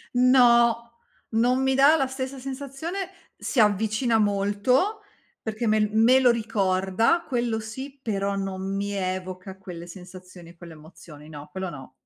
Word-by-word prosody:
No! 235 -2 +5 0.4
Non 245 +3 +2
mi 265 0 +2
dà 280 +4 +6
la 270 -4 +1
stessa 265 +1 -5
sensazione, 280 +8 -5 0.3
si 250 - +1
avvicina 215 +3 +2
molto, 205 - +1 0.4
perché 220 +1 -4
me 215 0 +3
l 210 0 +1
me 235 +4 +5
lo 255 -2 +5
ricorda, 215 - +1
quello 235 -3 -1
sì, 265 +6 -8
però 200 -2 -1
non 195 0 -4
mi 200 +1 -2
evoca 185 0 -4
quelle 175 -3 -9
sensazioni 180 -1 -12
e 170 - -17
quelle 170 -1 -11
emozioni. 155 -1 -14
No, 150 -1 -10
quello 190 0 -5
no. 135 -5 -10
215 Hz, 150 wpm, -25 LUFS, 185-255 Hz, 0.4 s, dà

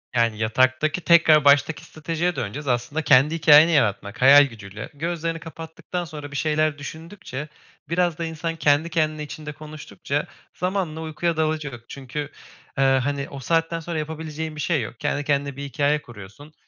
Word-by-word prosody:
Yani, 115 -2 +2
yataktaki 130 +9 +1
tekrar 160 -3 +5
baştaki 145 +3 +4
stratejiye 165 +3 -2
döneceğiz. 140 +9 -5
Aslında 125 +5 -1
kendi 150 +2 +4
hikâyeni 155 0 +7
yaratmak, 110 -6 0
hayal 140 +2 +9
gücüyle, 105 -3 -9
gözlerini 165 +2 -3
kapattıktan 165 +2 -7
sonra 150 -3 -9
bir 140 - -8
şeyler 155 -1 +1
düşündükçe, 160 0 -8 0.4
biraz 170 -1 +1
da 170 - -3
insan 165 +1 -4
kendi 155 +1 +2
kendine 155 -2 -1
içinde 150 0 -7
konuştukça, 150 -1 -5 0.3
zamanla 180 -3 -2
uykuya 160 +1 -2
dalacak 155 -7 -2
çünkü, 135 +1 -7 0.6
eee, 135 - +3
hani, 135 +1 +1
o 140 - -8
saatten 165 +4 0
sonra 165 -1 -4
yapabileceğin 155 0 -5
bir 150 - -5
şey 155 -3 +1
yok. 115 +1 -7
Kendi 145 - -1
kendine 140 -1 -1
bir 140 - -6
hikâye 145 +2 0
kuruyorsun. 120 +7 -13
150 Hz, 155 wpm, -23 LUFS, 140-160 Hz, 0.6 s, hayal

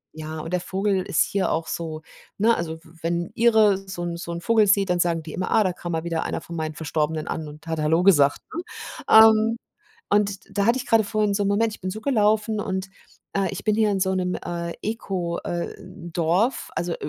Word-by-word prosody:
ja, 155 0 -6
und 165 +3 -7
der 180 - +2
Vogel 190 +1 0
ist - - +1
hier 195 -2 -1
auch 165 0 -1
so 160 -2 -4 0.4
ne? 230 +2 +4
Also 160 -1 -4
w 160 - -18
wenn 170 +1 0
'n - - -18
Ire 220 -4 +5
so 180 -2 -6
'n 170 -1 -3
so 170 0 -6
'n 170 0 -5
Vogel 225 0 +4
sieht, 195 -1 +3
dann 175 0 +1
sagen 170 -2 +1
die 160 - -8
immer: 185 - -3
„Ah, 215 - +5
da 185 -2 0
kann 175 -1 -6
mal 160 0 -2
wieder 165 -1 -2
einer - - -3
von 170 - -9
meinen 155 -1 -3
Verstorbenen 155 0 -2
an 155 - -4
und 150 +2 -12
hat 160 -1 -2
hallo 160 +3 +2
gesagt“, 145 -7 +4
ne? 335 - -2 0.5
Ähm, 220 +1 +7 0.5
und 205 -1 +2 0.2
da 200 +1 +2
hatte 240 +3 +3
ich 250 - -6
grade 225 -2 +4
vorhin 210 -1 0
so 205 - +1
'n 200 - +1
Moment, 220 +2 +1
ich - - -14
bin 185 - -2
so 220 - -6
gelaufen 215 -3 +2
und, 190 -2 -3 0.5
äh, 195 -1 +1
ich - - -7
bin 215 -1 +2
hier 215 -1 +3
in 195 - 0
so 190 0 +1
'nem, 180 -1 -1
äh, 170 -1 -3
Eko 190 -6 -3
äh, 175 -1 -3
Dorf, 180 +4 -1
also 170 0 -1
185 Hz, 230 wpm, -24 LUFS, 170-210 Hz, 0.5 s, Ähm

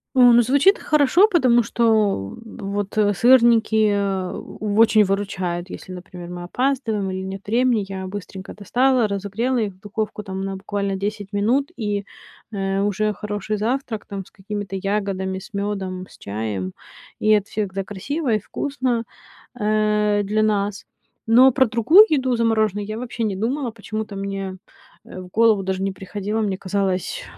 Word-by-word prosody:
О, 250 -2 +7
ну, 240 - +7
звучит 280 - +4
хорошо, 305 +7 +4
потому 255 - +4
что, 235 +1 -2
о 200 - +1
вот, 205 -2 -5 0.2
сырники, 230 -1 +4
э, 195 -2 -1 0.3
очень 215 +1 +4
выручают, 190 -3 -2
если, 185 - -9
например, 180 -1 -9
мы 175 0 -6
опаздываем 225 -2 -1
или 190 0 -4
нет 190 +1 -7
времени. 235 -1 +2
Я 190 -1 -5
быстренько 190 -1 -8
достала, 245 +3 +2
разогрела 205 +6 -2
их, 205 -3 -2
в 185 - -25
духовку, 210 +1 -4
там, 190 -1 -5
на 195 0 -3
буквально 200 0 -3
10 205 +1 -4
минут, 240 +8 +1
и, 205 -3 -2 0.5
э, 195 -2 -1
уже 205 +1 0
хороший 210 0 -4
завтрак, 230 0 -2
там, 195 -2 -6
с - - -20
какими-то 200 -1 -6
ягодами, 195 -1 -2
с 215 - -14
мёдом, 195 -2 -3
с - - -17
чаем. 100 -2 -4 0.5
И 215 - +4
от 205 -1 -4
всех, 205 -3 -3
да, 195 0 -2
красиво 240 - -2
и 215 - +2
вкусно, 255 +1 -2 0.6
э, 210 -1 +2
для 210 +2 0
нас. 205 -1 0 0.4
Но 250 +4 +7
про 260 +1 +4
другую 245 - +6
еду 265 -5 +1
замороженную 220 -3 +1
я 215 +1 -4
вообще 235 -1 -4
не 210 -3 -1
думала. 245 +6 -1
Почему-то 215 -1 -6
мне, 195 -1 -4 0.5
э, - - -9
в 185 - -10
голову 220 0 +3
даже 190 0 -2
не 195 - 0
приходило. 205 +3 -4
Мне 200 -3 -1
казалось, 195 - -2
205 Hz, 160 wpm, -22 LUFS, 195-230 Hz, 0.6 s, О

